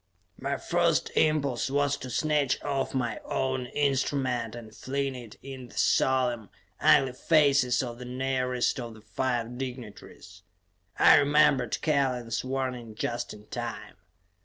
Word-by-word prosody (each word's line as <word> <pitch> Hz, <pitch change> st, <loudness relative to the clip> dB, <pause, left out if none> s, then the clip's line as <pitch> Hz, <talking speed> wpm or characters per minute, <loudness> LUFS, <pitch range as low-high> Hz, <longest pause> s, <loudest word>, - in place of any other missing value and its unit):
My 140 Hz, +1 st, -2 dB
first 170 Hz, -2 st, +1 dB
impulse 140 Hz, -6 st, +1 dB
was 145 Hz, +1 st, +1 dB
to 130 Hz, -, -8 dB
snatch 145 Hz, 0 st, +1 dB
off 135 Hz, -2 st, -2 dB
my 120 Hz, -4 st, -1 dB
own 130 Hz, -1 st, -2 dB
instrument 130 Hz, -4 st, 0 dB
and 110 Hz, -2 st, -10 dB
fling 135 Hz, +3 st, -2 dB
it 120 Hz, -4 st, -10 dB
in 130 Hz, -2 st, -8 dB
the -, -, -15 dB
solemn, 125 Hz, -5 st, +2 dB, 0.3 s
ugly 135 Hz, -2 st, +4 dB
faces 140 Hz, -4 st, +3 dB
of 120 Hz, -1 st, -6 dB
the 125 Hz, -, -7 dB
nearest 130 Hz, 0 st, -1 dB
of 120 Hz, -2 st, -6 dB
the 110 Hz, -, -14 dB
five 120 Hz, +1 st, -2 dB
dignataries; 110 Hz, -8 st, -8 dB, 0.6 s
I -, -, +7 dB
remembered 145 Hz, -4 st, +3 dB
Kellen's 130 Hz, -6 st, 0 dB
warning 130 Hz, -4 st, -3 dB
just 120 Hz, +2 st, -3 dB
in 105 Hz, 0 st, -12 dB
time. -, -, -6 dB
130 Hz, 135 wpm, -28 LUFS, 120-140 Hz, 0.6 s, I